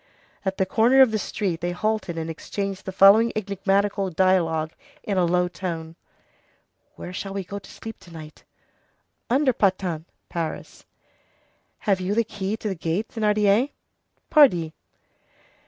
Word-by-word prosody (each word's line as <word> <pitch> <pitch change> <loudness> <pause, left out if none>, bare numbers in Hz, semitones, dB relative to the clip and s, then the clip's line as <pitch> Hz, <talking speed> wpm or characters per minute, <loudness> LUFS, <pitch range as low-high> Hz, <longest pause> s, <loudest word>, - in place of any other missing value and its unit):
At 190 -1 -2
the 190 - +2
corner 235 +7 +4
of 250 - +2
the 215 - 0
street 185 -5 -3
they 175 +1 -2
halted 215 -3 -2
and 160 0 -3
exchanged 195 +4 -5
the - - -2
following 200 +5 +6
enigmatical 200 -1 0
dialogue 165 -3 +1 0.3
in 200 - -2
a 180 -2 +3
low 180 +1 +2
tone:— 170 -3 -5 1.0
"Where 180 - -8
shall 195 +1 -5
we 195 - -2
go 200 +3 -6
to - - -16
sleep 225 0 -9
to 175 - -16
night?" 155 -2 -11 0.9
"Under 260 +1 +3
Pantin 185 -6 0 0.2
[Paris]." 165 -2 -5 0.9
"Have 195 -3 0
you 190 +3 -1
the 230 - +3
key 205 0 -4
to 220 - -5
the 200 - -1
gate, 170 +5 -2
Thénardier?" 210 +2 +2 0.6
"Pardi." 175 - +5
195 Hz, 145 wpm, -24 LUFS, 175-210 Hz, 1.0 s, following